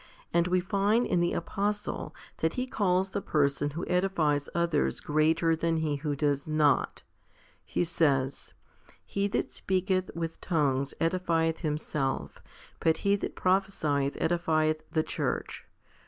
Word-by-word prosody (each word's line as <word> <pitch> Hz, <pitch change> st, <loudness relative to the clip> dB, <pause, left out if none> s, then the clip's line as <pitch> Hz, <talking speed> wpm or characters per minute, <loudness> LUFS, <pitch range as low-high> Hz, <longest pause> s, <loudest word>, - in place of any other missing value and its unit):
And 170 Hz, +1 st, +3 dB
we 180 Hz, 0 st, +2 dB
find 200 Hz, +5 st, +2 dB
in 175 Hz, -, +1 dB
the 175 Hz, 0 st, +1 dB
apostle 205 Hz, +4 st, -2 dB, 0.2 s
that 160 Hz, 0 st, 0 dB
he 250 Hz, -, -1 dB
calls 190 Hz, -5 st, +1 dB
the 200 Hz, -, -2 dB
person 145 Hz, -2 st, +1 dB
who 160 Hz, +4 st, -5 dB
edifies 170 Hz, -6 st, +1 dB
others 170 Hz, -3 st, +1 dB
greater 160 Hz, +2 st, +2 dB
than 165 Hz, 0 st, 0 dB
he 155 Hz, -2 st, 0 dB
who 145 Hz, 0 st, -2 dB
does 140 Hz, 0 st, 0 dB
not. 155 Hz, -2 st, +2 dB, 0.6 s
He -, -, -1 dB
says, 140 Hz, -6 st, 0 dB, 0.5 s
He 200 Hz, 0 st, -1 dB
that 200 Hz, -, -2 dB
speaketh 185 Hz, 0 st, 0 dB
with 165 Hz, -1 st, -4 dB
tongues 140 Hz, -5 st, 0 dB
edifieth 165 Hz, -1 st, +1 dB
himself, 150 Hz, -3 st, -2 dB, 0.4 s
but 160 Hz, -1 st, +2 dB
he 200 Hz, 0 st, +5 dB
that -, -, -5 dB
prophcsieth 185 Hz, -7 st, +1 dB
edifieth 155 Hz, -2 st, +1 dB
the 155 Hz, -, +1 dB
church. -, -, -3 dB
165 Hz, 135 wpm, -29 LUFS, 150-185 Hz, 0.6 s, he